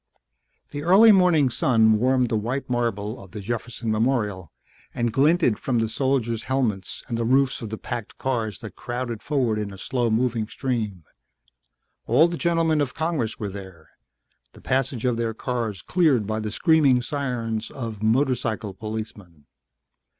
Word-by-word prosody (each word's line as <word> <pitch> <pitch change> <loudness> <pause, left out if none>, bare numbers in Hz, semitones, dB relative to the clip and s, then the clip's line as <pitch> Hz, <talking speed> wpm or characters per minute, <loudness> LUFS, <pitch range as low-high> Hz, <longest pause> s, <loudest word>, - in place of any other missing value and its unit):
The 145 - -5
early 195 +8 +7
morning 175 -9 +4
sun 110 -3 +3
warmed 125 0 +2
the - - 0
white 120 +6 -2
marble 115 -2 -2
of 95 - -16
the 105 - -5
Jefferson 115 +2 -4
Memorial 105 - 0 0.4
and 120 -2 -1
glinted 145 - +3
from 125 -3 -1
the 115 -1 +1
soldiers' 120 -1 -1
helmets 115 -8 -1
and 115 -1 -3
the - - 0
roofs 130 +3 +2
of 115 - -5
the 110 - -5
packed 120 -1 -6
cars 115 -5 -2
that 110 - -9
crowded 120 -2 -4
forward 125 -7 0
in 105 -1 -4
a 100 - -10
slow 120 +4 -1
moving 115 -1 0
stream. 110 - -3 1.0
All 140 +9 +5
the 170 - -4
gentlemen 165 -3 +1
of 130 -4 -2
Congress 160 -9 -1
were 105 - -4
there, 95 -5 -11 0.6
the - - -15
passage 130 -2 -1
of 125 -2 +1
their 115 -1 -2
cars 115 -7 -3
cleared 150 - +2
by 110 +1 -2
the 110 -1 -3
screaming 140 - +3
sirens 120 -6 -3
of 115 -5 -6
motorcycle 115 -3 0
policemen. 105 -7 -7
120 Hz, 155 wpm, -24 LUFS, 110-135 Hz, 1.0 s, early